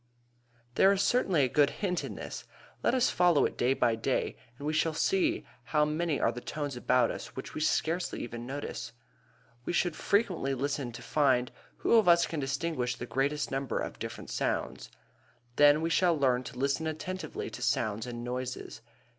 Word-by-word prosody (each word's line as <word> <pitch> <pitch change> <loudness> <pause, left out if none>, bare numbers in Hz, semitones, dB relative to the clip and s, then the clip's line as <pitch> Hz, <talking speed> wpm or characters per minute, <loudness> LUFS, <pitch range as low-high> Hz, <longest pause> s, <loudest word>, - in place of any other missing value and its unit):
There 195 - +5
is 200 0 +2
certainly 190 - +3
a - - +3
good 140 +3 +3
hint 180 -4 -2
in - - -6
this. - - -7 0.4
Let - - +2
us 255 -1 +3
follow 175 -4 +4
it - - -2
day 125 +2 +2
by 115 - +2
day, 115 +4 -1 0.2
and 145 - -8
we 155 - 0
shall 155 +1 +1
see 350 - +1 0.2
how 150 +3 +2
many 155 0 -1
are 115 - +2
the 120 - -7
tones 145 -2 -4
about 125 0 +2
us - - -8
which 130 - -7
we 155 - -4
scarcely 165 +3 0
ever 120 0 -6
notice. 135 +5 -5 0.7
We - - -3
should 175 -2 +1
frequently 185 - +1
listen 140 0 -2
and 120 -1 -8
find 125 0 +1 0.3
who - - +1
of 215 -4 +4
us 170 0 +6
can 160 - -4
distinguish 135 -2 -1
the 120 - -6
greatest 135 +5 -1
number 135 0 -2
of - - -4
different - - -6
sounds. - - -2 0.7
Then 145 +1 +6
we 165 +1 -1
shall 175 -2 +3
learn 130 -3 +2
to 125 - -8
listen 140 +4 0
attentively 185 +4 -5
to - - -8
sounds 110 +2 0
and 120 -1 -6
noises. 125 +1 -5
145 Hz, 185 wpm, -30 LUFS, 125-170 Hz, 0.7 s, us